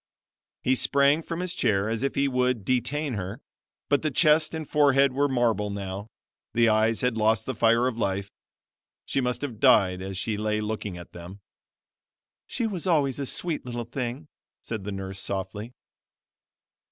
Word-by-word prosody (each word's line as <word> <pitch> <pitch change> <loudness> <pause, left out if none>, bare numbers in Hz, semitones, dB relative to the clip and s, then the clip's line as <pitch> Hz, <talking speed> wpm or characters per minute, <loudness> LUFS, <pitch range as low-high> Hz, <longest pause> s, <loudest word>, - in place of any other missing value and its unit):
He 130 - +3
sprang 140 +3 +4
from 165 +1 -5
his 180 -1 -3
chair 105 - +1
as 110 0 -2
if 135 - -1
he 140 0 +2
would 125 -5 0
detain 130 +3 0
her; 100 +3 -5 0.5
but 145 - +2
the 155 - 0
chest 155 +2 +3
and 160 -2 -5
forehead 140 -2 +4
were 140 +2 +2
marble 120 -6 +1
now, 100 0 -5 0.5
the 115 -1 +5
eyes 110 +1 +2
had 125 -2 0
lost 110 +1 +2
the 130 - -2
fire 115 +1 +3
of 125 -2 -2
life; 100 -1 -1 0.7
she 135 - 0
must 125 +2 -1
have 120 -7 -5
died 95 -9 +4
as 95 0 -5
she 105 +2 -2
lay 105 0 0
looking 105 -3 -4
at 85 - -11
them. 90 +3 -10 1.1
"She 240 - -1
was 190 -5 -3
always 145 -6 +2
a 140 - -2
sweet 170 +2 -3
little 120 -1 -5
thing," 125 +4 -5 0.3
said 110 -4 -6
the 105 - -3
nurse 95 0 -6
softly. 100 +4 -4
120 Hz, 170 wpm, -26 LUFS, 105-140 Hz, 1.1 s, the